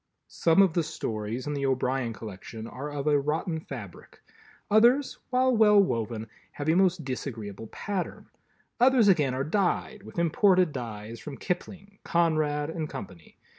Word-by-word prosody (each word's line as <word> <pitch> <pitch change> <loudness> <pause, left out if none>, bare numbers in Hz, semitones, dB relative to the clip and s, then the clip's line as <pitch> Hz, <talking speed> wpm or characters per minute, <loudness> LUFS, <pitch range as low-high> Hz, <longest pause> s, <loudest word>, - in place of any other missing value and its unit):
Some 165 +4 +4
of 185 -4 +2
the 170 - +2
Stories 110 -4 -4
in 150 - -2
the 140 -1 -1
O'Brien 130 -2 0
collection 110 +1 -8
are 135 +5 -6
of 145 -1 -4
a 150 -1 +4
rotten 160 +3 -1
fabric, 115 - -10 0.5
others, 240 +6 +4
while 255 0 +3
well 210 -2 +6
woven, 115 - 0 0.3
have 145 - -5
a 160 - +4
most 180 -3 +2
disagreeable 115 -5 -5
pattern. 195 - -5 0.5
Others 250 -3 +5
again 150 -8 +3
are 130 - -1
dyed 195 +5 -1
with - - -13
imported 180 +1 +3
dyes 115 -2 -6
from 140 +2 -8
Kipling, 195 +2 -5
Conrad 155 -3 +1
and 160 -2 -4
Company. 95 - -10
150 Hz, 150 wpm, -27 LUFS, 125-185 Hz, 0.5 s, well